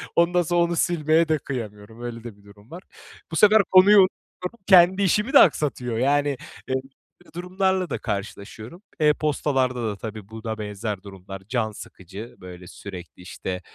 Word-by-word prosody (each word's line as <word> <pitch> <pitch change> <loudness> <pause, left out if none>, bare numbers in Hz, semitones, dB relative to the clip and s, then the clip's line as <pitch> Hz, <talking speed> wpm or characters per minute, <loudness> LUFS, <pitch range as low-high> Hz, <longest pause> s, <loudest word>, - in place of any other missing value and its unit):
Ondan 175 +1 +3
sonra 175 +1 +1
onu 170 0 -1
silmeye 165 -1 +2
de 155 - +2
kıyamıyorum. 110 -4 -7
Öyle 120 -1 -7
de 115 -4 -10
bir 100 - -23
durum 100 +4 -19
var. 175 +3 -9 0.5
Bu - - -4
sefer 210 +3 +6
konuyu 190 +3 +7
unutuyorum. 185 +2 -2
Kendi 185 +1 +6
işimi 210 +7 +1
de - - +9
aksatıyor. 130 - +2
Yani, 145 +2 +1 0.3
böyle 130 0 0 0.5
durumlarla 185 0 -1
da - - -2
karşılaşıyorum. 110 - -6 0.2
E-postalarda 140 -5 +1
da 105 - -4
tabii, 110 -1 -8
buna 110 0 -6
benzer 105 -1 -5
durumlar 95 -1 -10
can 115 -3 -1
sıkıcı. 100 +2 -11
Böyle, 90 -1 -11
sürekli, 90 -3 -10
işte, 90 0 -6
125 Hz, 155 wpm, -23 LUFS, 105-170 Hz, 0.5 s, de